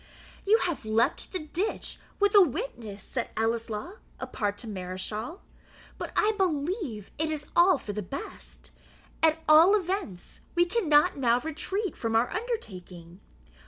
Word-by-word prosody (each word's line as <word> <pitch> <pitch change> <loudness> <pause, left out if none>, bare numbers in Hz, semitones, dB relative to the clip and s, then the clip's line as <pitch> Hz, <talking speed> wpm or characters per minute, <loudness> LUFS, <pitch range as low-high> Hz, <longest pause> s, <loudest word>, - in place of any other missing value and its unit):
"You 435 +2 +6
have 345 -8 -2
leaped 220 +2 +1
the 370 - -2
ditch 355 +6 -3 0.2
with 405 0 +3
a 410 - +9
witness," 230 - -2
said 240 -3 -3
Ellieslaw, 225 - -2 0.2
apart 205 -1 -2
to 225 - -7
Mareschal; 205 - -5 0.6
"but - - -4
I 430 - +4
believe 310 - -1
it 315 0 +1
is 300 -2 -3
all 345 0 +6
for 205 - -6
the 210 - -3
best; 275 +9 -8 0.5
at 320 0 +3
all 320 +6 +8
events, 370 - -3
we 345 0 +5
cannot 350 -4 +3
now 240 -3 +3
retreat 320 - -3
from 225 -1 -2
our 230 +2 +3
undertaking. 185 - -6
295 Hz, 140 wpm, -28 LUFS, 215-360 Hz, 0.6 s, a